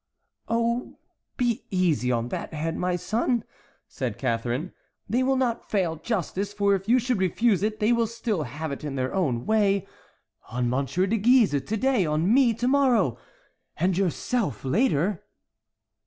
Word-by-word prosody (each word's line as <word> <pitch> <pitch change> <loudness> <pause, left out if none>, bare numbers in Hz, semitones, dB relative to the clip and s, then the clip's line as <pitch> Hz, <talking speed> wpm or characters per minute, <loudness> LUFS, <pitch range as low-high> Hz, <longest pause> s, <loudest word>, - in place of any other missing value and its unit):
"Oh, 235 +1 -1 0.4
be 240 -3 0
easy 170 -9 +1
on 120 0 -1
that 160 - -5
head, 160 +2 -2
my 180 0 0
son," 230 +5 0 0.4
said 120 -6 -4
Catharine; 120 +6 -2 0.3
"they 235 +5 +1
will 265 +1 +2
not 245 -3 -1
fail 180 -6 0
justice; 200 +2 -3
for 200 -1 +2
if 195 +2 -2
you 245 - +6
should 245 -3 0
refuse 190 +2 +2
it, 215 +1 -1
they 215 +3 +3
will 230 -1 +2
still 225 -5 -2
have 150 +3 -5
it 140 - -6
in 145 -2 -4
their 130 -1 -2
own 135 -11 0
way: 200 -3 +2 0.6
on 120 +1 -1
M. 135 +2 0
de 190 - +1
Guise 235 +1 +5
to 215 +11 -3
day, 260 -2 +2
on 155 +7 +2
me 260 -2 +5
to 240 +3 -1
morrow, 245 - +3 0.6
and 180 +2 +1
yourself 195 - -1
later." 185 - +1
195 Hz, 160 wpm, -25 LUFS, 155-230 Hz, 0.6 s, you